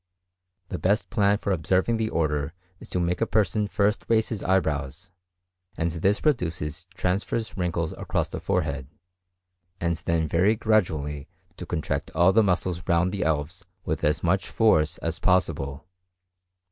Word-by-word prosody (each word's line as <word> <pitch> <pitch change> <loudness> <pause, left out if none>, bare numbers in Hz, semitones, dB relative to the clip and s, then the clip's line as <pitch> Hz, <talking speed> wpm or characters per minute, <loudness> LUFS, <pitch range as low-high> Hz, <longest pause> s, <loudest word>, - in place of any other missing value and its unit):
The 90 - -4
best 100 +4 +1
plan 105 -3 +3
for 100 - -2
observing 95 +6 +1
the 110 -1 -1
order 75 -2 -1 0.3
is - - -12
to 90 - -1
make 90 +2 0
a 115 - +2
person 105 0 +1
first 105 +1 +1
raise 110 -1 +2
his 110 -5 -4
eyebrows, 80 -1 -1 0.7
and 85 0 0
this 95 +6 +1
produces 90 - -1
transverse 100 +5 -1
wrinkles 85 -3 -1
across - - -2
the - - -6
forehead; 70 -2 -1 0.9
and 85 -1 0
then 80 -1 0
very 100 +8 +3
gradually 80 -11 0 0.3
to - - -8
contract - - -2
all 90 +3 +5
the 110 - +6
muscles 90 -3 0
round 85 +2 +2
the 100 - -2
elves 80 +3 -1 0.2
with 80 0 -2
as 75 +1 +1
much 95 +3 +1
force 80 -7 +3
as 85 0 -3
possible. 75 -7 0
90 Hz, 150 wpm, -26 LUFS, 80-100 Hz, 0.9 s, the